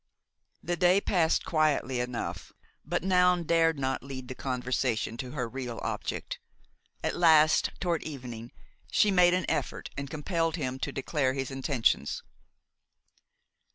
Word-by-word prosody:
The 175 - -1
day 180 +3 +4
passed 170 -5 +1
quietly 150 -5 +1
enough, 125 -1 -4 0.3
but - - -2
Noun 180 -2 +4
dared 165 -1 +3
not 130 -1 -1
lead 130 -2 -8
the - - -4
conversation 125 -3 -1
to 125 0 -5
her 125 -5 -2
real 125 -1 -5
object. - - -4 0.6
At - - -1
last, 155 -2 +5
toward 175 -3 0
evening, 120 -6 -7 0.4
she 210 - +3
made 180 -1 +5
an 185 - -1
effort - - -2
and 140 -1 -5
compelled 165 +1 -1
him 130 -5 -3
to - - -2
declare 135 -1 0
his 135 0 -3
intentions. 135 -2 0
140 Hz, 135 wpm, -29 LUFS, 130-170 Hz, 0.6 s, last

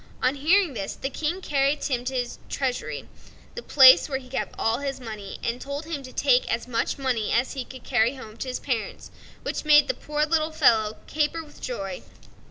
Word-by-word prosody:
On 255 +1 +3
hearing 325 +4 +3
this, 200 -5 -4
the 270 - -4
King 325 +7 -2
carried 280 -2 +1
Tom 245 -3 -1
to 265 +1 -3
his 245 -1 -3
treasury, 260 -3 -3 0.5
the 480 - -6
place 265 - +7
where 270 - -1
he 255 -1 -12
kept 265 - -3
all 225 +2 +1
his 275 -1 -4
money, 215 -5 -7
and 240 +1 -2
told 280 +2 -5
him 315 -3 -4
to 255 -1 -10
take 255 -2 +2
as 235 +1 -2
much 235 +3 -1
money 255 -6 -1
as 240 +3 +1
he 270 -2 -4
could 260 0 -12
carry 245 +1 +2
home 220 -5 -10
to 260 - -5
his 250 - -3
parents, 235 -5 -4 0.3
which - - -3
made 295 -1 +6
the 260 - +1
poor 300 +4 -1
little 315 0 +1
fellow 220 -8 +3
caper 310 +2 -1
with 295 - -17
joy. 195 -7 -4
265 Hz, 205 wpm, -25 LUFS, 240-295 Hz, 0.5 s, place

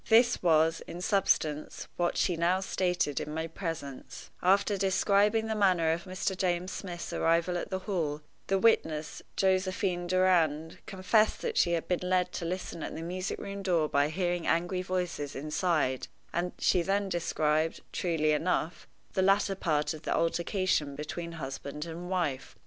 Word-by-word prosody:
This 235 +2 +5
was, 165 -1 +3
in 175 - -7
substance, 170 -6 0
what 175 0 0
she 180 - +2
now 170 +3 +2
stated 180 -6 0
in 150 - -5
my 160 0 -1
presence: 165 -5 -6
After 200 +3 +3
describing 200 +3 +2
the 220 - -1
manner 185 -6 +3
of 170 +1 -2
Mr. 185 +1 -2
James 180 0 -1
Smith's 175 -3 -6
arrival 170 +2 +2
at 175 - -3
the 190 - -1
Hall, 155 -7 -1 0.3
the 195 - +2
witness, 160 -8 +1
Josephine 185 -1 +1
Durand, 170 -4 +2
confessed 210 +3 +2
that 465 -2 -2
she 170 - +3
had 165 - -1
been 180 - 0
led 180 -1 +2
to 170 - -4
listen 175 -1 -4
at - - -5
the 165 - -5
music 185 +2 -3
room 200 0 -6
door 175 -5 +2
by 145 0 +2
hearing 175 +1 -1
angry 175 +2 +1
voices 180 -6 -3
inside, 150 -2 0 0.3
and 175 +1 -1
she 180 - +3
then 195 +3 0
described, 160 -3 0
truly 160 -3 +1
enough, 160 +2 -1 0.3
the 190 - +1
latter 195 +1 +3
part 155 -6 0
of 155 - -9
the - - -1
altercation 170 -3 0
between 170 +3 -5
husband 140 0 -6
and 170 +2 -7
wife. 170 -8 -2
175 Hz, 160 wpm, -30 LUFS, 160-190 Hz, 0.3 s, This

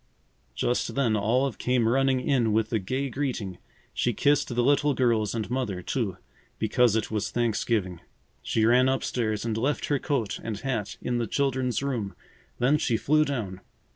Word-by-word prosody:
Just 120 - -1
then 125 -6 +2
Olive 120 +5 +1
came 125 -2 +2
running 130 +1 +2
in 120 -5 +1
with 110 +1 0
a 110 - +2
gay 130 +8 -2
greeting. 125 -9 -3 0.3
She 120 - 0
kissed 145 +6 +2
the 120 -1 0
little 145 +1 +3
girls 115 -4 +1
and 110 -3 -2
Mother, 110 -9 -2
too, 100 -7 -2 0.4
because 115 +1 +3
it 110 -1 -1
was 105 -2 -1
Thanksgiving. 110 -6 -1 0.4
She 110 - +1
ran 125 +3 +5
up 135 0 0
stairs 110 -3 -1
and 115 -2 -1
left 135 +6 0
her 145 -2 +2
coat 130 -9 -1
and 110 -2 -4
hat 120 -6 -3
in 120 -1 0
the 115 - -1
children's 130 0 0
room. 120 -8 -2 0.4
Then 135 +5 +3
she 115 -5 +1
flew 155 +5 +3
down. 110 -11 -4
120 Hz, 170 wpm, -27 LUFS, 110-135 Hz, 0.4 s, ran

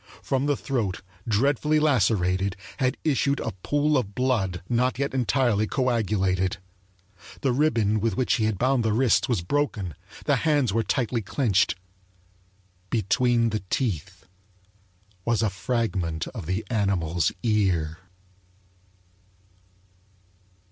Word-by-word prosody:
From 135 +1 0
the 145 -2 +1
throat, 115 -9 -2 0.3
dreadfully 140 +7 +2
lacerated, 100 -9 +2 0.2
had 130 -2 0
issued 140 -1 +1
a 115 - -3
pool 145 +3 +2
of 100 -5 -6
blood 110 -10 0
not 125 +1 +1
yet 140 0 -1
entirely 120 -4 +1
coagulated. 100 -8 0 0.8
The 135 - +2
ribbon 115 -6 +2
with 110 -2 -1
which 130 - +2
he 110 - +1
had 110 -2 0
bound 130 +1 +2
the 110 -1 +1
wrists 125 +3 +3
was 110 -9 0
broken; 105 - -1 0.3
the - - +3
hands 145 -9 +2
were 115 - +2
tightly 120 0 -1
clenched. 105 - +1 1.1
Between 115 +2 +2
the 110 - -2
teeth 105 - -2 1.0
was 115 +1 +1
a 105 - +1
fragment 95 -5 -2
of 105 -10 -8
the 95 +4 -2
animal's 90 -6 +1
ear. 90 -8 +1
115 Hz, 120 wpm, -25 LUFS, 95-130 Hz, 1.1 s, wrists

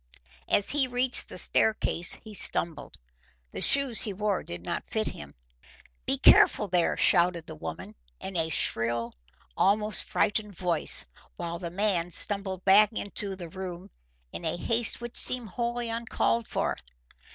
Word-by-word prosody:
As 200 - +2
he 280 -2 +2
reached 250 +1 +1
the - - -9
staircase 195 -5 +1
he 215 - -13
stumbled. 170 -4 +1 0.5
The - - -7
shoes 275 -5 +4
he 205 - 0
wore 205 -1 -2
did 85 0 -8
not - - -4
fit 220 -1 -1
him. 70 -1 -11 0.7
"Be - - +2
careful, 210 - +5
there!" 175 -2 +1
shouted 175 -2 +2
the - - -9
woman, 80 +1 -8 0.3
in 190 - -7
a 165 -1 +1
shrill, 115 -5 0 0.4
almost 210 +1 +3
frightened 210 -1 -1
voice, 175 -3 +2 0.3
while 170 0 -6
the 170 - -5
man 180 -2 0
stumbled 190 0 -2
back 205 +2 +5
into 200 -2 -5
the 175 -3 -9
room 185 +1 -8 0.4
in - - -8
a 160 +1 -2
haste 230 +5 0
which 240 0 -8
seemed 245 -4 +1
wholly 240 +2 -3
uncalled 230 0 -1
for. - - -2
195 Hz, 150 wpm, -27 LUFS, 170-220 Hz, 0.7 s, careful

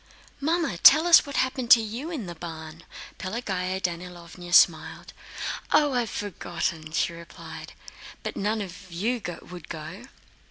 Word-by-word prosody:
"Mamma, 320 - 0
tell 310 +4 +8
us 340 -3 +7
what 280 - -6
happened 260 -2 -1
to 240 - +9
you 230 +8 -5
in 295 - -4
the 175 - -6
barn." 160 -1 -9 0.3
Pelagéya 190 -2 -3
Danílovna 175 0 -6
smiled. 160 -3 +3 0.6
"Oh, 295 -2 +4
I've 240 -3 0
forgotten..." 175 -4 -4
she 170 - 0
replied. 170 0 -10 0.5
"But - - -4
none 210 +2 -1
of 185 0 -11
you 220 +8 -1 0.3
would 175 -3 -10
go?" 160 +7 -8
185 Hz, 135 wpm, -26 LUFS, 170-245 Hz, 0.6 s, to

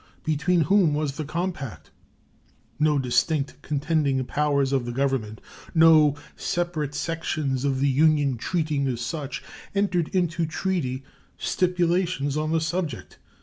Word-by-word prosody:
Between 160 +3 +1
whom 165 -1 +3
was 150 -1 -1
the 155 - -2
compact? 145 - -4 0.9
No 150 -1 +3
distinct 140 +3 0
contending 145 -3 0
powers 140 -1 +1
of 130 -3 +1
the - - -2
Government, 125 -5 -1 0.4
no 160 -3 +6 0.2
separate 165 -5 -2
sections 145 -4 -2
of 135 -2 +1
the 140 - +2
Union 145 -1 +3
treating 150 +1 -1
as 120 -2 -2
such, 140 +3 -4 0.3
entered 185 -5 +1
into 170 -3 0
treaty 155 -7 -2 0.3
stipulations 175 -5 0
on 155 +1 -1
the 165 0 +2
subject. 165 -5 -3
150 Hz, 125 wpm, -25 LUFS, 135-165 Hz, 0.9 s, no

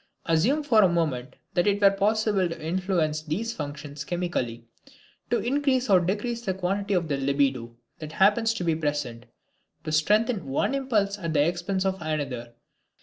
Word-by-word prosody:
Assume 210 - +2
for 230 -7 +5
a 190 - +5
moment 150 -7 -1 0.2
that 175 +3 +2
it 205 0 +2
were 200 -1 +6
possible 205 -2 +1
to 165 - -6
influence 165 -2 -1
these 190 +10 -3
functions 145 -1 -6
chemically, 135 -8 -3 0.6
to 240 - +2
increase 260 -2 +1
or 185 - +7
to 175 - -2
decrease 230 +5 -2
the 190 -5 -2
quantity 195 +2 -1
of 170 -2 0
the 140 -2 -1
libido 135 -4 0 0.2
that 155 0 -7
happens 210 +5 +3
to 185 - -3
be 165 -2 +2
present, 145 -6 -3 0.6
to 155 - -4
strengthen 210 - +2
one 135 - 0
impulse 215 -7 0
at 165 -4 -3
the 145 0 +4
expense 180 +3 -1
of 190 -1 -1
another. 135 -7 -4
175 Hz, 170 wpm, -26 LUFS, 150-205 Hz, 0.6 s, or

